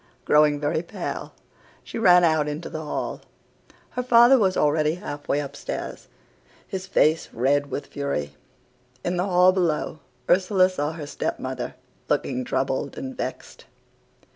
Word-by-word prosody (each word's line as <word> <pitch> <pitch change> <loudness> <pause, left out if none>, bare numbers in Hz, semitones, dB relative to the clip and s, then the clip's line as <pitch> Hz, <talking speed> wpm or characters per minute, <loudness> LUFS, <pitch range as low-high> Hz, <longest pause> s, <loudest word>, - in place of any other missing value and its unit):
Growing 150 -1 +4
very 150 +2 0
pale, 170 - -6 0.5
she - - -6
ran 180 -4 +6
out 155 -3 +3
into 150 +3 -5
the 155 - -4
hall. 150 - -4 0.7
Her 250 - -2
father 245 +1 +6
was 190 -3 +2
already 150 +1 +2
half 145 -6 -7
way 145 - +1
upstairs, 140 -1 -6 0.6
his 190 0 -5
face 160 -4 +2
red 140 +4 +1
with 145 - -4
fury. 75 - -3 0.7
In 175 +1 0
the 180 - +1
hall 180 -1 +5
below 170 -4 -1 0.3
Ursula 185 0 +4
saw 150 -3 -2
her 160 -2 -7
step - - -3
mother, - - -5 0.3
looking 125 - 0
troubled 130 +2 -2
and 265 -1 -6
vexed. - - -6
155 Hz, 140 wpm, -24 LUFS, 145-185 Hz, 0.7 s, ran